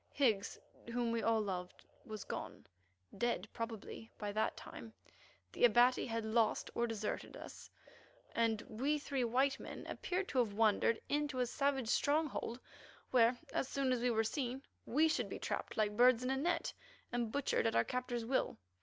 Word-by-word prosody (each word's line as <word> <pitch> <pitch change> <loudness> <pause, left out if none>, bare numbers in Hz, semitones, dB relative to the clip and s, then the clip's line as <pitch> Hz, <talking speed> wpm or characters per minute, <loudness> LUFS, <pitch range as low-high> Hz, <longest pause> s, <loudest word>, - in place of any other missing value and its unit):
Higgs, 225 -7 +2 0.3
whom 240 -1 0
we 230 0 0
all 225 0 +3
loved, 180 -3 -5 0.2
was 215 -2 -5
gone, - - -6 0.5
dead, 235 -5 0
probably, 225 -1 -6
by 205 -1 -3
that 215 +2 0
time; 225 -1 -9 0.6
the - - -3
Abati 245 +2 +5
had 230 -1 -2
lost 220 0 +1
or 235 - +1
deserted 215 -2 -4
us, - - -10 0.6
and 225 -2 +1
we 275 +7 0
three 280 -3 -1
white 265 +4 +2
men - - -8
appeared 370 +2 -2
to 260 - +1
have 225 -4 +2
wandered 220 +1 +3
into 290 -2 0
a 250 - +3
savage 270 -1 0
stronghold, 285 -2 +1 0.5
where, 245 -1 +5 0.2
as - - 0
soon 270 -1 0
as 250 - +2
we 250 - +2
were 225 -1 +2
seen, 255 +2 -2 0.2
we 305 +6 +4
should 320 - 0
be - - -4
trapped - - -4
like 210 -1 +1
birds 245 +1 +6
in 255 - 0
a - - +2
net, 335 +5 0 0.4
and 240 -2 -1
butchered 280 -4 +1
at 225 - 0
our - - +5
captor's 250 -2 -2
will. 260 - 0
240 Hz, 170 wpm, -36 LUFS, 225-265 Hz, 0.6 s, birds